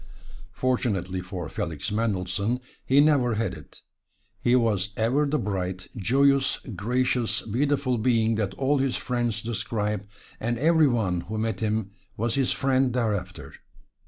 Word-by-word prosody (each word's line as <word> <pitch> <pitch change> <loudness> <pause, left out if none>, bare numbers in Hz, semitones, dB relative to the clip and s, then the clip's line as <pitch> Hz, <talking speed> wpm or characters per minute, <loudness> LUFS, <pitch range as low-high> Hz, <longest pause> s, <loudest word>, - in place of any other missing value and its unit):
Fortunately 100 -8 0
for 90 -2 -6
Felix 80 +3 -4
Mendelssohn 105 +1 -1 0.3
he 135 +2 +5
never 140 -6 +4
had 115 +2 -1
it - - -13 0.6
he 120 - +3
was 105 -5 +1
ever 130 +7 +2
the 150 +2 +1
bright, 95 -4 -3
joyous, 135 +5 +3 0.2
gracious, 120 +1 0
beautiful 130 +2 0
being 115 -1 +2
that 105 -3 -1
all 140 +1 +1
his 135 -1 +1
friends 120 -3 -1
describe, 105 -2 -2 0.3
and 120 +1 -1
every 160 +3 +4
one 100 -9 0
who 110 +5 -5
met 110 -2 -1
him 110 -2 -1 0.3
was 115 +2 0
his 135 -1 +1
friend 130 -2 +2
thereafter. 105 -7 -2
115 Hz, 135 wpm, -26 LUFS, 100-130 Hz, 0.6 s, he